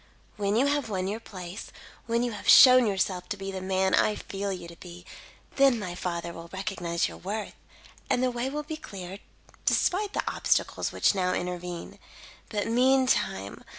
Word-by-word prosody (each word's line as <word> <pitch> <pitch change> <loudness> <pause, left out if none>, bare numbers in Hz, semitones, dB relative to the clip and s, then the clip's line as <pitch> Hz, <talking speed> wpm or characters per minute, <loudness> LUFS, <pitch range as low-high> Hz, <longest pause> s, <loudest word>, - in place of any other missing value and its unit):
When 205 0 0
you 250 +5 +4
have 285 -4 0
won 190 -2 -2
your 210 +3 -3
place 185 -3 -8 0.4
when 235 +1 +1
you 245 - -1
have 210 - -4
shown 255 -2 +9
yourself 190 -2 -1
to 205 - -3
be 195 0 -5
the 190 -1 -5
man 190 0 +1
I 210 - +3
feel 200 0 -4
you 180 -2 -6
to 170 - -11
be, 175 0 -11 0.5
then 275 -3 +5
my 185 -5 -5
father 170 -1 -4
will 165 0 -10
recognise 185 -3 -2
your - - -9
worth, 205 +3 -5 0.6
and 245 - +2
the 255 - +2
way 245 +2 -2
will 300 +2 -4
be 310 +1 -6
cleared, 190 - -8 0.4
despite 400 +2 +1
the - - -1
obstacles - - 0
which - - +3
now 185 -2 0
intervene. 180 -1 -5 0.5
"But 205 -2 -1
meantime! 250 - +1
195 Hz, 180 wpm, -27 LUFS, 180-240 Hz, 0.6 s, shown